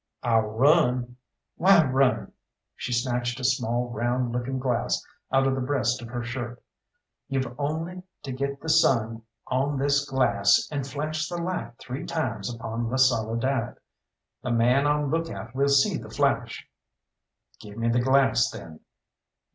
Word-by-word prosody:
"I'll 115 -2 +3
run." 125 0 +2 0.4
"Why 180 -3 +6
run?" 130 0 +1 0.4
She 135 - -5
snatched 120 0 -1
a - - -7
small 125 -1 0
round 120 +1 -1
looking 125 +2 -2
glass 125 -3 -1 0.3
out 135 0 +3
of 135 - +2
the 130 - -2
breast 125 -3 0
of 120 - -8
her 120 +1 -4
shirt. 120 0 -5 0.7
"You've 130 -3 -2
only 165 +5 -3 0.2
to 135 - -5
get 140 +1 -3
the - - -8
sun 115 -8 +3 0.2
on 135 +3 0
this 140 +1 +1
glass 100 -7 +3
and 140 -3 -3
flash 155 +2 -3
the 175 - -4
light 170 -9 -4
three 135 +7 -6
times 120 - -2
upon 115 0 -4
La 130 - -1
Soledad. 115 0 +1 0.7
The - - -4
man 125 +5 +3
on 150 -1 +1
look 165 +1 0
out 110 +1 -8
will 140 +1 +1
see 140 -1 +3
the - - -10
flash." - - -1 0.9
"Give 105 0 -11
me 115 0 -1
the 120 +1 +2
glass, 130 -1 +3
then." 80 -8 -10
130 Hz, 155 wpm, -26 LUFS, 120-140 Hz, 0.9 s, Why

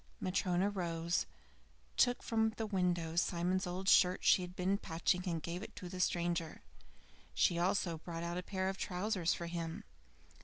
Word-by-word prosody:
Matryona 185 +1 +1
rose, 170 -3 -1 0.7
took 245 0 +3
from 220 -1 +1
the 225 - -1
window 175 -5 0
Simon's 180 +2 +1
old 185 +2 -4
shirt 180 -1 +5
she - - +6
had 180 0 -7
been 190 +2 +1
patching, 175 0 0
and 165 -3 -2
gave 170 +2 -4
it - - -9
to 180 - -7
the 185 0 -6
stranger. 170 -2 0 0.7
She 170 - +3
also 175 -2 +1
brought 165 0 -6
out 170 +1 -2
a - - -3
pair 190 0 -2
of 190 0 -3
trousers 185 -2 0
for 170 - -5
him. 170 -1 -4
180 Hz, 165 wpm, -35 LUFS, 170-190 Hz, 0.7 s, she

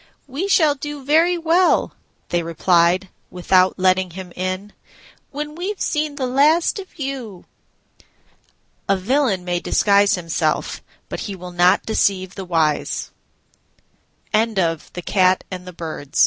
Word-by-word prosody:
"We 290 +8 -4
shall 315 -6 +4
do 290 -1 -7
very 330 +5 +3
well," 340 +2 +2 0.4
they 175 - +1
replied, 170 +2 +2 0.2
without 185 +1 +2
letting 185 0 +2
him 180 0 -9
in, 185 +3 -4 0.6
"when 295 +1 -5
we've 370 +5 -4
seen 300 -1 -1
the 270 -3 -2
last 300 +9 +3
of 380 -2 -11
you." 265 - -6 1.4
A 195 - +3
villain 205 -2 0
may 175 -1 -1
disguise 200 +2 +3
himself, 165 -3 -2 0.3
but - - -6
he 200 - -5
will 180 -1 -9
not 175 +1 +3
deceive 195 -4 0
the 195 - -7
wise. 160 -4 0 1.2
THE 215 - +5
SPENDTHRIFT 185 -2 0
AND 180 -1 -7
THE 180 - -9 0.2
S 145 -2 -9
195 Hz, 130 wpm, -20 LUFS, 180-285 Hz, 1.4 s, THE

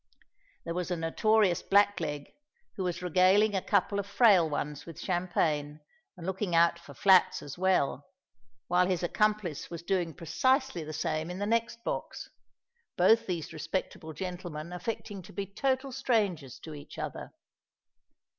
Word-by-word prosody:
There 165 - -3
was 180 0 -3
a 180 - -1
notorious 185 +3 +2
black 205 -1 +3
leg, 150 -3 -4 0.4
who 190 - -3
was 180 -1 -3
regaling 185 +4 +4
a 190 - 0
couple 200 +2 +1
of 200 - -4
frail 200 -6 +5
ones 150 0 -4
with 165 - -9
champagne 155 -5 -1 0.4
and 170 - -9
looking 190 -1 -2
out 170 0 +4
for - - -13
flats 190 -2 +4
as 145 - -7
well; 180 -7 +1 0.6
while 180 +1 +3
his 180 -2 -1
accomplice 210 -3 0
was 170 -1 -7
doing 175 -3 -1
precisely 260 - +1
the 155 - -7
same 155 +1 -2
in 180 - -5
the 205 - -2
next 230 +1 -1
box,—both 465 - -2
these 170 -3 -3
respectable 160 0 -4
gentlemen 175 -2 -6
affecting 205 +1 -5
to 180 - -14
be 200 - -3
total 265 +6 -1
strangers 195 - 0
to 160 - -8
each 145 -1 -11
other. - - -6
180 Hz, 150 wpm, -30 LUFS, 165-205 Hz, 0.6 s, frail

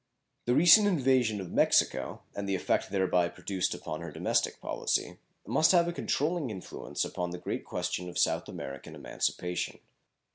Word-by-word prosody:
The 125 - +2
recent 175 +8 +7
invasion 130 - +2
of 95 -3 -7
Mexico, - - +2
and 100 -1 -4
the 95 - +1
effect 95 - 0
thereby 90 -3 +2
produced 95 +1 -2
upon 80 - -6
her 85 - -6
domestic - - 0
policy, - - -2 0.3
must 160 - +3
have 170 -1 +5
a 175 - -2
controlling 155 -2 -1
influence 95 -4 -4
upon 90 0 -3
the 90 - -5
great - - -4
question 90 0 -3
of 90 - -7
South - - +1
American 70 0 -7
emancipation. 90 0 -2
100 Hz, 155 wpm, -30 LUFS, 90-145 Hz, 0.3 s, recent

